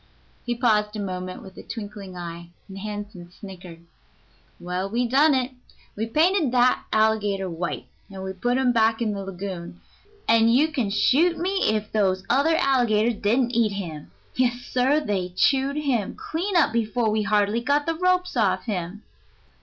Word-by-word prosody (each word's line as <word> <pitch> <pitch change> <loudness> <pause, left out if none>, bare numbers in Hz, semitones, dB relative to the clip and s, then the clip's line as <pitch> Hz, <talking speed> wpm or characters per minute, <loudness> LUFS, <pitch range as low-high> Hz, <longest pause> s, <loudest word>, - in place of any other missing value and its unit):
He 240 - 0
paused 215 -3 +1
a - - -4
moment 185 -2 -5
with 190 0 -13
a - - -7
twinkling 205 -4 -8
eye, 170 -1 -7 0.2
and 195 -1 -9
Hansen 205 -3 -7
snickered. 180 -3 -12 0.7
"Well, 180 +2 -3
we 240 +3 0
done 280 +4 +4
it. 255 0 -1 0.4
We 220 +2 -2
painted 315 - +2
that 250 0 +3
alligator 210 -3 +1
white, 175 0 -4 0.2
and 190 -1 -7
put 245 +1 +1
him 260 -2 +3
back 225 -1 +2
in 225 -3 0
the 200 -1 -4
lagoon, 185 -2 -7 0.5
and 230 0 +5
you 285 +7 +4
can 255 -9 -1
shoot 305 - +3
me 375 - 0
if 215 -1 -1
those 190 -3 +1
other 285 +6 +3
alligators 240 -6 +2
didn't 235 +4 +2
eat 230 -4 +1
him. 165 - -6 0.2
Yes, 245 -1 0
sir; 260 +5 +1
they 185 -8 -2
chewed 275 +5 +2
him 260 -9 -1
clean 360 +5 -3
up 305 -8 +3
before 230 0 0
we'd 215 -1 0
hardly 210 +2 +2
got 285 +4 +1
the 330 - 0
ropes 365 +1 +1
off 195 -5 +1
him." 195 -1 -4
220 Hz, 165 wpm, -24 LUFS, 195-255 Hz, 0.7 s, and